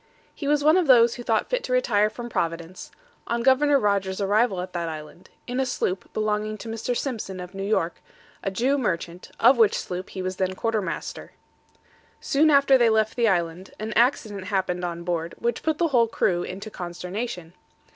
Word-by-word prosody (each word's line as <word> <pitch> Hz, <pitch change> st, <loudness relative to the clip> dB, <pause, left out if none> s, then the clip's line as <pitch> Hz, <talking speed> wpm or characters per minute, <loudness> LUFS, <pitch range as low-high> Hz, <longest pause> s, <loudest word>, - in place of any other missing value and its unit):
He 285 Hz, -, -6 dB
was 295 Hz, 0 st, +2 dB
one 310 Hz, +4 st, +5 dB
of 360 Hz, -4 st, +2 dB
those 235 Hz, -3 st, +6 dB
who -, -, -7 dB
thought 225 Hz, -2 st, 0 dB
fit -, -, 0 dB
to -, -, -6 dB
retire 215 Hz, -, +3 dB
from 240 Hz, +2 st, -7 dB
Providence, 170 Hz, -4 st, -4 dB, 0.4 s
on 235 Hz, 0 st, -1 dB
Governor 280 Hz, +3 st, +4 dB
Rogers' 200 Hz, -4 st, 0 dB
arrival 205 Hz, 0 st, +2 dB
at 185 Hz, 0 st, -7 dB
that 170 Hz, -2 st, -2 dB
island, 155 Hz, +3 st, -9 dB, 0.2 s
in 250 Hz, +1 st, -3 dB
a 265 Hz, -, +2 dB
sloop 185 Hz, -6 st, -2 dB
belonging 215 Hz, 0 st, -1 dB
to 230 Hz, -, -9 dB
Mr. 225 Hz, +2 st, -2 dB
Simpson, 215 Hz, -8 st, -4 dB
of 180 Hz, +1 st, -8 dB
New 195 Hz, -, -6 dB
York, 195 Hz, -4 st, -1 dB, 0.4 s
a -, -, -1 dB
Jew 255 Hz, +9 st, +1 dB
merchant, 175 Hz, -6 st, -3 dB
of 255 Hz, -, +6 dB
which 220 Hz, -3 st, +5 dB
sloop 185 Hz, +1 st, -5 dB
he 190 Hz, -, -6 dB
was 185 Hz, 0 st, -3 dB
then 185 Hz, 0 st, -1 dB
quarter 225 Hz, +1 st, 0 dB
master. 185 Hz, -, -6 dB, 0.9 s
Soon 305 Hz, +3 st, +3 dB
after 280 Hz, -2 st, +5 dB
they 235 Hz, -1 st, +5 dB
left 220 Hz, 0 st, +1 dB
the 235 Hz, -2 st, +2 dB
island, 175 Hz, -1 st, -1 dB
an 215 Hz, +1 st, -4 dB
accident 220 Hz, -5 st, +1 dB
happened 185 Hz, -3 st, -1 dB
on 170 Hz, -1 st, -4 dB
board, 170 Hz, -1 st, -3 dB
which 235 Hz, 0 st, -2 dB
put 315 Hz, -1 st, 0 dB
the 335 Hz, 0 st, +1 dB
whole 240 Hz, -4 st, +4 dB
crew 180 Hz, -5 st, 0 dB
into 200 Hz, +5 st, -6 dB
consternation. 180 Hz, +1 st, -6 dB
215 Hz, 195 wpm, -25 LUFS, 185-245 Hz, 0.9 s, those